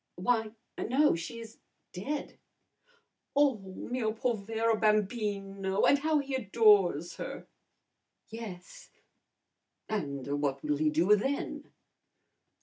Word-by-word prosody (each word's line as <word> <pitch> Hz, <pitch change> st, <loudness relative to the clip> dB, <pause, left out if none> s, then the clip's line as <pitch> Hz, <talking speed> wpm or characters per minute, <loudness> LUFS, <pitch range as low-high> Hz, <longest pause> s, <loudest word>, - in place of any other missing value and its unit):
"Why, 220 Hz, +3 st, 0 dB, 0.3 s
no! 280 Hz, +6 st, +3 dB
She 170 Hz, +8 st, -5 dB
is 225 Hz, 0 st, -12 dB, 0.3 s
dead!" 275 Hz, +11 st, -5 dB, 1.0 s
"Oh, 280 Hz, -5 st, +4 dB
mio 215 Hz, +4 st, -3 dB
povero 225 Hz, 0 st, 0 dB
bambino! 205 Hz, -2 st, 0 dB
And 285 Hz, -, +5 dB
how 310 Hz, +1 st, +2 dB
he 280 Hz, -1 st, -2 dB
adores 205 Hz, -, +3 dB
her!" -, -, -6 dB, 0.8 s
"Yes." 225 Hz, -, -9 dB, 1.0 s
"And 145 Hz, -8 st, -3 dB
what 140 Hz, -2 st, -1 dB
will 150 Hz, -1 st, 0 dB
he 155 Hz, +1 st, +2 dB
do 170 Hz, +7 st, +4 dB
then?" 270 Hz, +7 st, -3 dB
215 Hz, 100 wpm, -30 LUFS, 185-240 Hz, 1.0 s, And